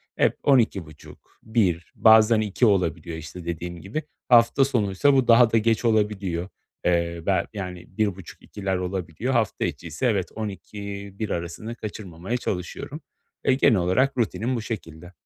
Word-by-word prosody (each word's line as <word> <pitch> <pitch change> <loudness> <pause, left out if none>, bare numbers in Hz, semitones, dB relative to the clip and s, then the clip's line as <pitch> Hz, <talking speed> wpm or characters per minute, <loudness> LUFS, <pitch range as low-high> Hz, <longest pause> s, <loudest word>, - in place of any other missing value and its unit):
Hep - - +2
00.30-1.00 95 - 0
bazen 110 0 +6
2.00 105 +3 +1
olabiliyor 85 -5 0
işte, 80 +2 -9
dediğim 85 0 -5
gibi. 115 +12 -4 0.3
Hafta 120 +2 +5
sonuysa 120 +1 +2
bu 130 -3 +3
daha 115 0 +6
da 115 - +4
geç 115 +1 +1
olabiliyor. 105 -5 0 0.4
Eee, 85 -1 +1
bel 95 -3 +2
yani, 90 -4 -6
1.30-2.00'ler 95 -1 -3
olabiliyor. 90 +5 -3
Hafta 115 -4 +1
içiyse, 80 - -4
evet, 100 -6 +1
00.00-1.00 100 0 -6
arasını 85 +7 -4
kaçırmamaya 105 0 -5
çalışıyorum. 90 -7 -5 0.4
Eee, - - +4
genel 130 -3 +4
olarak 125 +11 +1
rutinim 120 +1 0
bu 115 - -2
şekilde. 90 -6 -7
100 Hz, 130 wpm, -24 LUFS, 90-115 Hz, 0.4 s, bazen